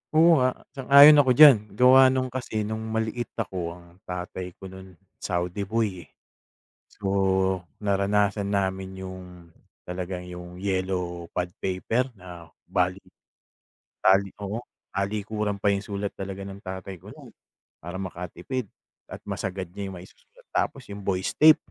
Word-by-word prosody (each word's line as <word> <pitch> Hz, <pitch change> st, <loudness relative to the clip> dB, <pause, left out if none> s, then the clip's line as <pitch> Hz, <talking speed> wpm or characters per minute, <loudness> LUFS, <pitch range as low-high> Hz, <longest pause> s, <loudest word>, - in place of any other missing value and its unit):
Oo 165 Hz, -2 st, +6 dB
nga, 130 Hz, 0 st, +2 dB, 0.2 s
sang-ayon 140 Hz, +2 st, +8 dB
ako 130 Hz, -3 st, +4 dB
diyan, 145 Hz, -6 st, +10 dB, 0.2 s
gawa 130 Hz, +3 st, +7 dB
nung 130 Hz, -1 st, 0 dB
kasi 115 Hz, -4 st, -3 dB
nung 110 Hz, +1 st, -3 dB, 0.2 s
maliit 110 Hz, +2 st, -2 dB
ako 90 Hz, -6 st, -4 dB
ang 85 Hz, +1 st, -18 dB
tatay 90 Hz, 0 st, -6 dB
ko 95 Hz, -1 st, -10 dB
no'n 95 Hz, -1 st, -12 dB, 0.2 s
Saudi 90 Hz, +2 st, -2 dB
boy, 105 Hz, -5 st, -2 dB
eh. -, -, -35 dB, 0.8 s
So, 100 Hz, -, -8 dB, 0.7 s
naranasan 100 Hz, 0 st, +1 dB
namin 95 Hz, -1 st, -2 dB
yung 90 Hz, -2 st, -11 dB, 0.3 s
talagang 90 Hz, 0 st, -5 dB
yung 90 Hz, 0 st, -9 dB
yellow 90 Hz, -3 st, -2 dB
pad 90 Hz, 0 st, -2 dB
paper 115 Hz, +8 st, -1 dB
na 90 Hz, -2 st, -11 dB, 0.2 s
bali -, -, 0 dB, 1.1 s
taliko 100 Hz, +3 st, +1 dB, 0.3 s
talikuran 105 Hz, +1 st, -2 dB
pa 100 Hz, -, +2 dB
yung 100 Hz, -, 0 dB
sulat 100 Hz, 0 st, -4 dB
talaga 95 Hz, 0 st, -6 dB
ng 100 Hz, +1 st, -9 dB
tatay 95 Hz, 0 st, -6 dB
ko -, -, -14 dB
no'n -, -, -14 dB, 0.5 s
para 85 Hz, +3 st, -6 dB
makatipid 95 Hz, +5 st, -5 dB, 0.4 s
at -, -, -7 dB
masagad 95 Hz, 0 st, -4 dB
niya 100 Hz, -1 st, -5 dB
yung 95 Hz, -, -8 dB
maisusulat. 475 Hz, -, -17 dB
Tapos 135 Hz, -2 st, -1 dB
yung 100 Hz, -, -8 dB
voice 95 Hz, -1 st, -1 dB
tape 155 Hz, 0 st, +7 dB
100 Hz, 140 wpm, -26 LUFS, 90-110 Hz, 1.1 s, diyan